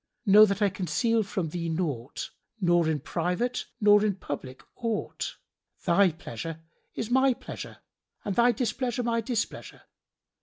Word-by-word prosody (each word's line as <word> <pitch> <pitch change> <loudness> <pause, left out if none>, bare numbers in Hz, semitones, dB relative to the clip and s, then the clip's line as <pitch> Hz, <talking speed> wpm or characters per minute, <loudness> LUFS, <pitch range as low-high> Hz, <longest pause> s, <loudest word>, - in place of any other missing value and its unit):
Know 210 +1 +9
that 200 +1 0
I 205 - +4
conceal 200 +6 +1
from 190 -5 -2
thee 170 +1 -3
naught, 150 -7 -3 0.3
nor 175 -3 +3
in 150 -3 -1
private 180 - -1
nor 205 -1 +6
in 205 -3 +1
public 140 -7 -7
aught; 230 -3 -3 0.5
thy 185 +1 +5
pleasure 160 +1 -7 0.4
is 225 +1 -4
my 265 0 +4
pleasure, - - -8 0.5
and 200 - -1
thy 240 +1 +5
displeasure 245 +1 -1
my 230 -1 +1
displeasure. 230 0 -4
200 Hz, 140 wpm, -28 LUFS, 170-230 Hz, 0.5 s, Know